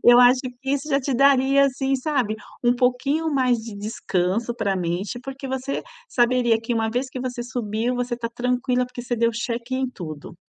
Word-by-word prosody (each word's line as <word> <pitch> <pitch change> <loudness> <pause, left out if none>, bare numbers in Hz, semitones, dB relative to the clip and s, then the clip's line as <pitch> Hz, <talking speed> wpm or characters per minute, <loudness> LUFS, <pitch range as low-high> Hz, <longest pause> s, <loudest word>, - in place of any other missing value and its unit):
Eu 240 0 +8
acho 250 +1 +6 0.2
que 270 - -2
isso 280 +2 -1
já 275 -2 +3
te 270 0 -2
daria, 275 +1 +5
assim, 270 0 0
sabe, 255 -5 0 0.3
um 240 0 +5
pouquinho 265 +6 +1
mais 255 -3 +3
de 225 -2 -8
descanso 205 +1 -1
para 220 -4 0
a - - -2
mente, 180 +6 -2
porque 270 +1 -7
você 265 +1 -2 0.3
saberia 240 - +3
que 230 +2 -3
uma 225 -1 +1
vez 250 +3 -1
que 255 - -5
você 250 -1 -3
subiu, 235 0 -2
você 245 -1 -2
tá 235 -1 -3
tranquila 250 0 0
porque 250 -1 -8
você 240 0 -2
deu 230 0 +3
cheque 235 +2 -3
em 260 0 0
tudo. 155 -9 -8
245 Hz, 200 wpm, -23 LUFS, 230-265 Hz, 0.3 s, Eu